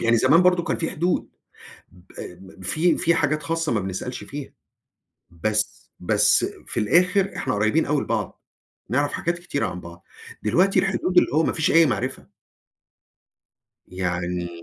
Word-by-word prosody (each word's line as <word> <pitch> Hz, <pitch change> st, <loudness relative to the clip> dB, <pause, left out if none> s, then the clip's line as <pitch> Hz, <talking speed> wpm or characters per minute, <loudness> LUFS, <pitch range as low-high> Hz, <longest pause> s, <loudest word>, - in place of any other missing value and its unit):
يعني 115 Hz, 0 st, +3 dB
زمان 140 Hz, +9 st, +5 dB
برضه 180 Hz, -1 st, +3 dB
كان -, -, -1 dB
في 165 Hz, -, -2 dB
حدود. 175 Hz, +2 st, -1 dB, 0.6 s
ب 90 Hz, +1 st, -12 dB
في 160 Hz, -, +1 dB
في 170 Hz, -1 st, +2 dB
حاجات 155 Hz, -1 st, 0 dB
خاصة 165 Hz, 0 st, -1 dB
ما 115 Hz, -, +1 dB
بنسألش 95 Hz, +6 st, -5 dB
فيها. 145 Hz, -1 st, -8 dB, 0.8 s
بس 105 Hz, +5 st, -2 dB
بس -, -, +3 dB, 0.2 s
في -, -, -3 dB
الآخر 180 Hz, -, +2 dB
إحنا -, -, -2 dB
قريبين 110 Hz, +10 st, +1 dB
أوي 145 Hz, -1 st, +1 dB
لبعض، 110 Hz, -3 st, -3 dB, 0.5 s
نعرف 145 Hz, +4 st, +1 dB
حاجات 170 Hz, +1 st, -2 dB
كتيرة 140 Hz, -8 st, -2 dB
عن 90 Hz, -1 st, -6 dB
بعض. 85 Hz, 0 st, -12 dB, 0.4 s
دلوقتي 185 Hz, -, +2 dB
الحدود 190 Hz, -2 st, +1 dB
اللي -, -, +4 dB
هو 160 Hz, -, +4 dB
ما -, -, 0 dB
فيش 160 Hz, +4 st, 0 dB
أي 165 Hz, -1 st, +6 dB
معرفة. 130 Hz, 0 st, -3 dB, 1.6 s
يعني 90 Hz, -1 st, -3 dB
140 Hz, 150 wpm, -23 LUFS, -, 1.6 s, أي